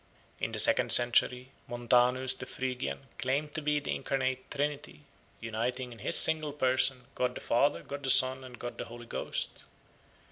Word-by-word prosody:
In - - -3
the - - -3
second - - +5
century 125 +1 +3 0.2
Montanus 125 +2 +1
the 125 - -9
Phrygian 125 - -4 0.2
claimed 140 +4 -2
to 155 - -3
be 150 0 0
the 145 - -4
incarnate 130 -1 -3
Trinity, 145 +1 -4 0.4
uniting 120 +3 -4
in 115 - -12
his - - +2
single 155 -2 +3
person 130 -2 +1
God 125 0 -2
the - - -6
Father, 130 +5 0
God 140 0 -8
the 135 - -3
Son, 130 0 +6
and 125 -1 -11
God 120 0 -8
the - - -4
Holy 120 +1 -11
Ghost. - - -4
130 Hz, 170 wpm, -29 LUFS, 120-140 Hz, 0.4 s, Son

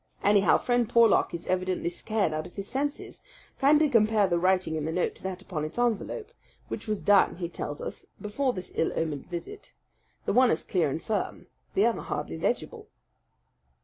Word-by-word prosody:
Anyhow, 205 -1 +5
Friend 245 -2 +1
Porlock 230 -3 +4
is 170 0 -6
evidently 185 -1 -1
scared 205 -3 -1
out 155 +2 -3
of 175 - -18
his 200 -1 -5
senses 285 +3 -4 0.4
kindly 300 +3 +5
compare 220 -5 +4
the 175 -2 +1
writing 185 -2 +2
in 155 - -2
the 160 - -2
note 180 +2 0
to - - -12
that 190 0 -5
upon 160 -6 -4
its 155 +6 -5
envelope; 240 - -1 0.4
which - - -6
was 210 -2 -2
done, 205 -1 +5
he 175 -1 -4
tells 145 -3 -5
us, - - -6
before 255 +6 -1
this 185 -6 -6
ill 160 - 0
omened 155 -4 -2
visit. 185 - -8 0.5
The - - 0
one 250 +2 +5
is 160 - +1
clear 170 -6 +1
and 140 - -2
firm. 210 -4 -3 0.3
The - - +4
other - - +1
hardly 80 0 -4
legible." - - -2
195 Hz, 185 wpm, -28 LUFS, 170-235 Hz, 0.5 s, Anyhow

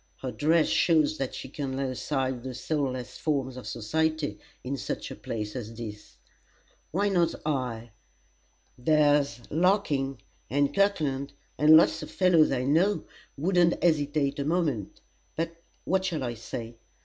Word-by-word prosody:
Her 130 - -2
dress 160 +3 +3
shows 155 -2 +3
that 135 -2 -3
she - - -6
can 135 -3 -4
lay 135 -1 -1
aside 130 -1 -2
the 130 0 -6
soulless 130 -3 -3
forms 135 -4 -1
of 125 -5 -8
society 155 +8 -1 0.2
in 130 +2 -2
such 135 - -4
a - - -6
place 105 -2 -5
as 115 -2 -6
this: 105 -2 -9 0.7
why 200 +5 +1
not 175 -4 +2
I? 125 -6 -2 0.9
There's 145 -2 +3
Larkin, 155 -6 +1 0.3
and 145 +1 +1
Kirkland, 145 -9 +1 0.2
and 155 +1 +7
lots - - +3
of - - -7
fellows 180 -4 +4
I 130 -2 0
know, 170 +10 +2 0.3
wouldn't 175 +2 +2
hesitate 145 -3 +1
a - - 0
moment. 150 - -1 0.3
But 165 +1 -3 0.3
what 190 +1 +1
shall 165 -7 -2
I 120 -1 -2
say? 115 +1 -7
145 Hz, 145 wpm, -28 LUFS, 130-160 Hz, 0.9 s, and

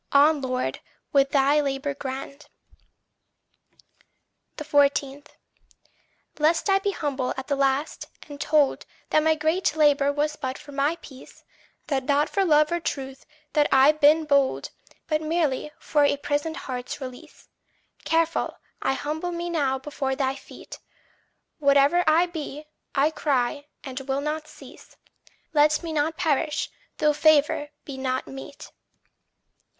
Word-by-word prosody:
On, 290 +1 +5
Lord, 255 -1 -2 0.3
with 275 -1 +4
thy 280 +1 +3
labour 275 0 -2
grand. 275 +1 -7 2.1
14. 285 -2 +1 1.2
Lest 320 +5 +2
I 390 - +4
be 400 - -1
humbled 280 -8 -2
at 265 - -5
the 285 - 0
last, 275 +2 0 0.2
and 290 -1 -9
told 295 -3 +2 0.2
That 310 - +4
my 315 +1 +3
great 315 +2 0
labour 290 -2 +4
was 300 +1 -1
but 260 -1 -4
for 300 - -13
my 285 +3 0
peace 265 -2 -14 0.4
That 265 -3 -1
not 290 +1 +2
for 395 - +1
love 305 -3 +4
or 345 - 0
truth 270 -4 -5 0.3
had 295 -1 +3
I 270 +2 +7
been 305 +1 +4
bold, 280 -2 +1 0.3
But 310 -1 0
merely 310 -3 -1
for 295 -2 +1
a 285 0 +3
prisoned 290 +3 -2
heart's 250 0 -5
release; 255 -2 -10 0.6
Careful, 330 0 0 0.2
I - - +1
humble 310 +5 -3
me 345 0 -4
now 280 -5 +1
before 265 -1 -3
thy 265 -1 0
feet: 270 - -12 0.8
Whate'er 280 +4 +4
I 320 +3 +5
be, 310 -3 -7 0.3
I 290 +3 +3
cry, 285 -1 -1 0.2
and 265 -1 -6
will 270 +1 -2
not 305 +1 -3
cease - - -15 0.6
Let 305 +1 +3
me 330 -1 -4
not 315 +1 0
perish, 300 -1 0 0.3
though 300 0 +3
favour 295 -1 +3 0.2
be 270 -2 -7
not 260 0 -2
meet. 270 +1 -10
290 Hz, 135 wpm, -25 LUFS, 275-310 Hz, 2.1 s, I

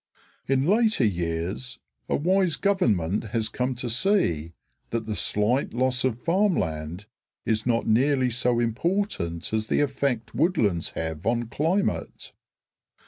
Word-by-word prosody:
In 135 0 +2
later 215 - +3
years 90 +6 -2 0.3
a - - +2
wise 185 +1 +2
government 110 - +1
has 110 0 -2
come 125 0 -2
to 125 +1 -4
see 115 - +1 0.4
that 115 -1 -2
the 110 - -3
slight 105 +6 0
loss 130 0 +1
of 125 -2 -1
farmland 100 - 0 0.4
is 110 +1 0
not 115 -1 +1
nearly 130 +3 +2
so 120 0 +1
important 120 - -1
as 110 0 0
the - - +1
effect 135 -5 -1
woodlands 115 - +1
have 80 +1 -4
on 120 0 0
climate. 175 - -1
120 Hz, 130 wpm, -25 LUFS, 105-145 Hz, 0.4 s, later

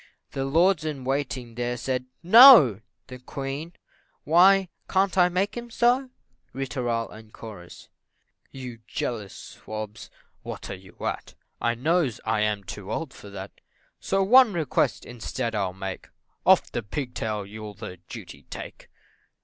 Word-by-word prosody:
The 135 -1 -3
lords 165 +4 +3
in 150 -4 -4
waiting 130 -3 -2
there, 120 +1 -2
said 125 +1 -2 0.2
"No!" 185 - +9 0.2
The 125 0 -10
Queen 140 +6 -6 0.5
"Why, 185 +4 +5 0.2
can't 190 0 +2
I 180 -1 +5
make 185 +3 -1
him 240 0 -6
so?" 245 +3 +2 0.4
Ri 135 +2 -3
tooral, 120 -3 -2
&c. 110 -4 -11 0.7
"You 125 -3 -8
jealous 105 -6 -4
swabs, 110 -1 -8 0.3
what - - -7
are - - -4
you 95 -1 -16
at? - - -4 0.3
I 120 0 +1
knows 150 -1 +1
I 110 0 +1
am 105 -1 0
too 95 +1 -8
old 160 -5 -4
for 100 - -12
that 100 0 -8 0.5
So 195 0 0
one 245 +2 +6
request 160 -6 0
instead 115 -1 -4
I'll 100 -4 -1
make. 95 0 -7 0.4
Off - - +5 0.2
pigtail 110 -6 -3
you'll 105 0 -9
the 90 - -8
duty - - -10
take." - - -9
125 Hz, 140 wpm, -25 LUFS, 110-175 Hz, 0.7 s, No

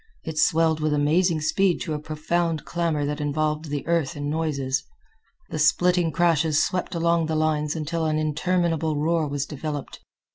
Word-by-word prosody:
It 160 -1 -4
swelled 160 -1 +3
with 155 -1 +1
amazing 160 +3 +2
speed 180 +4 +2
to 155 - -3
a 150 - -2
profound 160 +1 -2
clamor 165 -4 -1
that 150 +1 -3
involved 150 +1 -1
the 145 -2 -4
earth 165 -4 0
in 145 0 -3
noises. 145 -4 -1 0.7
The 155 - -3
splitting 175 +2 +3
crashes 160 -3 +2
swept 180 -1 -3
along 170 -1 +2
the 160 - -1
lines 155 -1 0
until 160 +1 -2
an 155 0 0
interminable 160 0 0
roar 160 0 +1
was 140 0 -2
developed. 150 -1 -6
155 Hz, 160 wpm, -24 LUFS, 150-165 Hz, 0.7 s, swelled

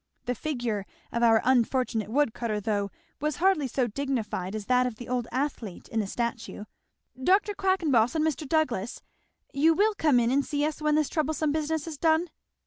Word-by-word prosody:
The 245 - 0
figure 240 -7 -3 0.2
of 235 - -1
our 225 -2 +5
unfortunate 250 -3 +1
wood 265 -1 +2
cutter 220 -4 -2
though, 205 -1 -1 0.3
was 300 -1 -1
hardly 365 -6 +2
so 255 +1 0
dignified 225 -6 -3
as 215 -2 -5
that 250 +2 +3
of 245 - -5
the 240 +2 -9
old 245 -2 -1
athlete 255 -8 -3
in 225 - -1
the 210 - -1
statue. 235 -1 -4 0.6
Dr. 400 +6 +3
Quackenboss, 325 - +2
and 315 -1 +2
Mr. 300 -2 -2
Douglass, 250 -10 0 0.5
you 320 +4 +4
will 425 +4 +3
come 300 -10 +3
in 235 0 +2
and 280 +2 +3
see 290 +1 -1
us 305 0 -3
when 300 0 +2
this 305 -2 +2
troublesome 310 0 0
business 315 0 -1
is 315 -4 -7
done?" 325 +1 +2
265 Hz, 185 wpm, -27 LUFS, 230-310 Hz, 0.6 s, our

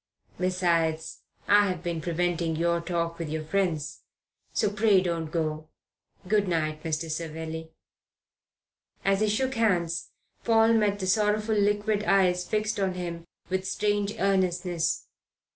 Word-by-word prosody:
Besides, 170 -3 0 0.3
I 205 0 +6
have 180 -2 -3
been 170 -2 -2
preventing 170 -1 -1
your 170 +1 +1
talk 170 -1 -2
with 160 -3 -4
our 155 0 -2
friends. 160 -3 -1 0.5
So 210 - +1
pray 210 -2 +4
don't 170 -3 -2
go. 155 -1 -2 0.6
Good 205 0 +2
night, 155 -3 -1
Mr. 160 0 -2
Savelli." 160 0 -5 1.4
As 195 0 +3
he 215 0 +2
shook 260 +5 0
hands 175 -8 0 0.3
Paul 225 0 +4
met 210 -3 +2
the 190 - -3
sorrowful 210 +2 +2
liquid 205 0 +1
eyes 180 -2 +3
fixed 215 0 0
on 190 -2 0
him 170 -2 -5 0.2
with 190 0 -1
strange 205 0 0
earnestness. 180 -3 0
180 Hz, 130 wpm, -27 LUFS, 165-205 Hz, 1.4 s, I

